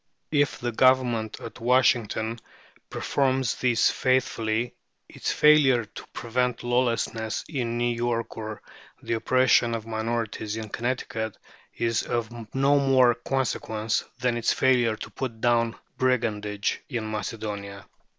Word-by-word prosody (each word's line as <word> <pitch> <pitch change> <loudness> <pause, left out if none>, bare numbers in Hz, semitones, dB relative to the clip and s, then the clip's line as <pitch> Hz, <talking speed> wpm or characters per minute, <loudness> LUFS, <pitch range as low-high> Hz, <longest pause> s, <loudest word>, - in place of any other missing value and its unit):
If 145 -2 +2
the 120 0 -2
Government 120 -3 +2
at - - -9
Washington 115 -2 +2 0.5
performs 130 -3 0
these 120 -2 +3
faithfully, 120 -3 0 0.3
its - - -3
failure 140 -6 +5
to - - -11
prevent 125 +1 -1
lawlessness 120 -2 0
in 120 -6 -2
New 120 0 +1
York 115 -1 -2
or 110 -1 -6 0.4
the - - -2
oppression 120 0 +3
of 110 -1 -5
minorities 110 -1 -3
in 110 -1 -6
Connecticut 115 -2 -3 0.4
is 115 -1 0
of 120 -1 -2 0.2
no 140 +2 +4
more 130 -3 +5
consequence 115 -4 -1
than 125 -2 0
its 120 - +1
failure 125 -4 +3
to - - -9
put 115 -4 -5
down 115 -1 +2 0.2
brigandage 105 -5 0
in 115 -5 -3
Macedonia. 105 -2 -5
120 Hz, 120 wpm, -26 LUFS, 110-130 Hz, 0.5 s, failure